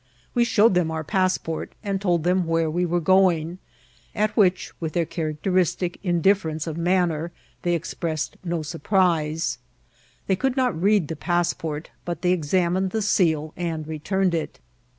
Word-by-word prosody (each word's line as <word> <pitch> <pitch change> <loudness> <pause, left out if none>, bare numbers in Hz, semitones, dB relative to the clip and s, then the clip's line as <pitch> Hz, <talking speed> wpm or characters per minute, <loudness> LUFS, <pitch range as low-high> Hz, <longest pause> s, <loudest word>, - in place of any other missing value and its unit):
We 240 -2 +3
showed 225 -2 +4
them 180 -3 +2
our 160 0 -3
pass* 185 +2 +1
port, 160 -1 -5
and 195 -2 -2
told 175 -5 +1
them 180 0 +2
where 165 -1 +1
we 175 +2 0
were 175 +1 +1
going, 175 -1 +3 0.6
at 210 0 0
which, 185 -3 +2
with 160 -2 -4
their 170 -1 +1
characteristic 175 +3 -1
indifference 175 -3 +1
of 160 -2 -4
manner, 170 -1 +1 0.3
they 175 -1 +1
expressed 165 -2 -3
no 170 -3 -2
surprise. 160 - 0 0.7
They 190 - +2
could 265 +6 -1
not 250 -10 +1
read 200 -4 +3
the 160 - -4
pass 175 +2 0
port, 155 -1 -6
but 175 -1 -5
they 180 - +3
examined 180 +2 +1
the 220 +3 -1
seal 160 -6 +1
and 165 -3 -3
returned 180 +4 0
it. 165 -2 -3
175 Hz, 160 wpm, -24 LUFS, 160-190 Hz, 0.7 s, showed